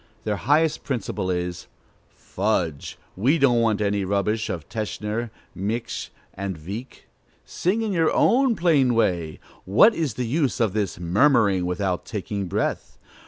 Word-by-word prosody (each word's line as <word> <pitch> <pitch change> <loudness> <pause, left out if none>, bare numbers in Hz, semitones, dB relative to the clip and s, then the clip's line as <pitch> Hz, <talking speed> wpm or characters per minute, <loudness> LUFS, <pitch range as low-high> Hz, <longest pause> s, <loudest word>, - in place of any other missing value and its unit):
Their 105 -2 -1
highest 145 - +2
principle 105 -7 -3
is: 90 -1 -3 0.4
"Fudge! 90 -7 -2 0.2
we 130 - +2
don't 125 -5 +4
want 110 -2 +1
any 100 -1 0
rubbish 100 +3 0
of 85 -5 -5
Teschner, 110 +1 -3 0.2
Miksch, 110 +5 -3 0.2
and 95 -2 -4
Wieck. 100 - -8 0.4
Sing 205 +6 -1
in 215 - -1
your 165 -4 +2
own 255 -1 +3
plain 150 - +3
way: 85 -8 0 0.2
what 115 - +5
is 155 - -2
the 125 - -2
use 140 +3 0
of 110 -5 +1
this 105 -5 -2
murmuring 100 - +3
without 90 0 -1
taking 100 -1 -4
breath? 100 +4 -2
105 Hz, 140 wpm, -24 LUFS, 95-130 Hz, 0.4 s, what